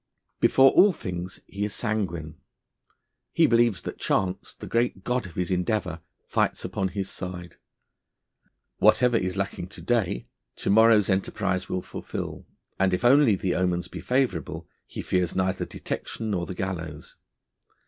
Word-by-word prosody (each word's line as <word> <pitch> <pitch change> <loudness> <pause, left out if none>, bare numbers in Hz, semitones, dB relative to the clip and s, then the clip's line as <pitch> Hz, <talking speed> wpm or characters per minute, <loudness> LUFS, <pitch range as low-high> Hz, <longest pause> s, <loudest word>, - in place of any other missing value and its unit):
Before 135 0 +6
all 200 -1 +6
things, 90 - -6
he 100 +1 -5
is 105 -1 -2
sanguine; 90 -9 -2 1.0
he - - +5
believes 115 -4 +3
that - - -6
Chance, 95 -1 -1
the - - -9
great 115 -5 0
god 125 -2 -1
of 85 - -14
his 90 0 -1
endeavour, 90 -2 -1 0.3
fights - - 0
upon 95 - -1
his 95 +1 -3
side. 90 -2 -7 1.2
Whatever 115 +3 +5
is 95 -3 0
lacking 100 -2 -3
to 95 - -11
day, 110 - 0 0.3
to - - -1
morrow's 110 -1 +6
enterprise 95 -1 -1
will 90 0 -2
fulfil, - - -6 0.3
and 95 -1 +3
if 95 - -3
only 130 -3 +6
the 95 -1 -1
omens 90 -1 0
be 90 - -8
favourable, 125 -5 -1 0.2
he - - -6
fears 90 -2 0
neither 95 0 0
detection 110 -1 -5
nor 90 -3 -1
the 95 - -5
gallows. 85 -6 -5
95 Hz, 150 wpm, -26 LUFS, 90-110 Hz, 1.2 s, Before